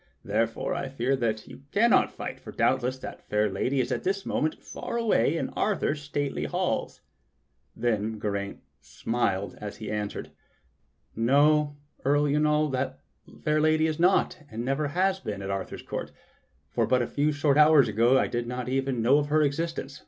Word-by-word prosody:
Therefore 110 +2 0
I 135 - -3
fear 130 0 0 0.3
you - - -12
cannot 230 +3 +4
fight, - - -6
for - - -10
doubtless 130 +2 +1
that - - -8
fair 105 0 +2
lady 135 +7 0
is 125 - 0
at - - -1
this 195 +1 -1
moment 155 0 0
far - - -6
away 165 - +2
in - - -2
Arthur's 165 -8 -1
stately 145 - -2
halls." 75 - -2 0.7
Then 110 -2 -1
Geraint 100 -1 -3 0.2
smiled 95 +6 -2
as 105 -1 -6
he 110 - -6
answered: 105 -1 -4 0.8
"No,. 145 +5 +3 0.3
Earl 145 +2 +3
Yniol, 150 +1 +2
that 130 +1 -2 0.5
fair 155 0 +2
lady 155 0 +3
is 160 0 -1
not, 180 +3 +3
and 115 +2 -5
never 135 +3 0
has 185 +5 +1
been, 100 - -5
at 95 - -3
Arthur's 95 -1 -4
court; - - -5 0.6
for - - 0
but 125 -1 +3
a - - -3
few 145 +1 +1
short 145 0 +2
hours 150 -3 +7
ago 115 +5 +4
I - - +3
did 120 0 -3
not 125 0 -4
even 130 -2 0
know 135 +5 +5
of 145 - -1
her 155 +1 +3
existence. 145 -1 -2
135 Hz, 170 wpm, -27 LUFS, 115-150 Hz, 0.8 s, hours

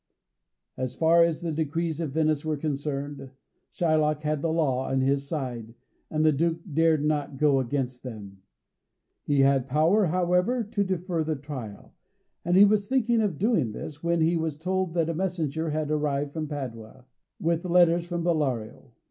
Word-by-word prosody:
As 130 -1 -3
far 165 +1 +5
as 165 -2 0
the 165 - -2
decrees 160 +1 -2
of 150 -5 -3
Venice 155 -2 +1
were 155 -1 -1
concerned, 145 -1 -4 0.4
Shylock 155 -2 +1
had 150 -1 -1
the 165 - 0
law 135 -5 0
on 135 0 +1
his 135 +1 0
side, 125 -7 -5 0.3
and 155 0 0
the 155 - +6
Duke 165 +3 0
dared 160 -1 +3
not 145 -2 -1
go 145 -1 +3
against 125 -1 -2
them. 100 -6 -9 0.8
He 145 -2 +2
had 135 -1 +3
power, 165 +9 +3
however, 180 +8 +1
to 205 -1 -1
defer 180 -3 -2
the 155 0 -1
trial, 130 -8 -8 0.5
and 175 +2 +2
he 200 - +9
was 205 0 +2
thinking 240 -3 +2
of 200 -8 -1
doing 170 - +1
this, 150 +5 -8
when 170 0 +1
he 165 +2 +3
was 160 -3 -2
told 185 +1 -2
that 165 -2 +1
a 165 - -1
messenger 165 -3 -2
had 155 0 -2
arrived 145 -1 -1
from 155 -2 -3
Padua, 125 -5 -7 0.3
with 165 0 0
letters 175 -1 +4
from 175 -1 -3
Bellario. 140 -10 -2
155 Hz, 170 wpm, -26 LUFS, 140-170 Hz, 0.8 s, he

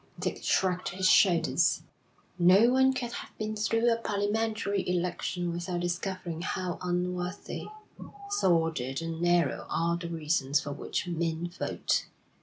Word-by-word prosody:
Dick - - -3
shrugged 180 -1 +1
his 185 +1 0
shoulders. 170 -3 +4 0.6
'No 190 +7 +6
one 265 +1 +5
can 250 -2 -3
have - - -8
been 215 0 -3
through 225 +2 +1
a - - -1
parliamentary 210 -1 -1
election 175 0 -1
without 175 +1 -3
discovering 175 -1 -3
how 185 -1 -3
unworthy, 180 +1 -3 0.6
sordid, 165 - +1
and 165 0 -4
narrow 175 0 +2
are 170 +1 +1
the 170 -1 -6
reasons 150 -3 +1
for 145 - -5
which 145 - -3
men 170 0 -2
vote. 175 - -1
175 Hz, 130 wpm, -29 LUFS, 170-200 Hz, 0.6 s, No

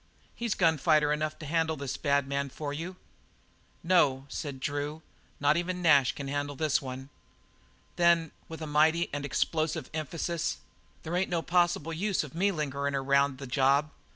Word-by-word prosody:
He's 235 -2 -2
gun 165 -4 +3
fighter 150 +1 +3
enough 155 +1 -2
to 155 - -9
handle 160 +1 0
this 140 -2 -4
bad 140 -1 +1
man 140 0 -2
for 145 +1 -5
you." 170 +5 -5 0.9
"No," 145 -7 +3
said 140 -3 -5
Drew, 145 +3 -3 0.4
"not 145 +2 +3
even 180 +1 -2
Nash 140 -6 +5
can 140 - -6
handle 145 +1 -2
this 155 0 +1
one." 130 +1 -7 0.9
"Then" 170 -2 +4 0.2
with 160 0 -7
a - - -3
mighty 155 +3 +2
and 145 -1 -3
explosive 155 +2 -1
emphasis 160 +2 -2 0.5
"there 165 +2 -3
ain't 185 +1 +1
no 170 -2 -1
possible 175 -2 +1
use 195 +3 0
of 150 - -10
me 195 +5 +2
lingering 140 -4 -2
around 140 0 +2
the 135 - -7
job. 140 +3 +2
150 Hz, 165 wpm, -29 LUFS, 140-165 Hz, 0.9 s, Nash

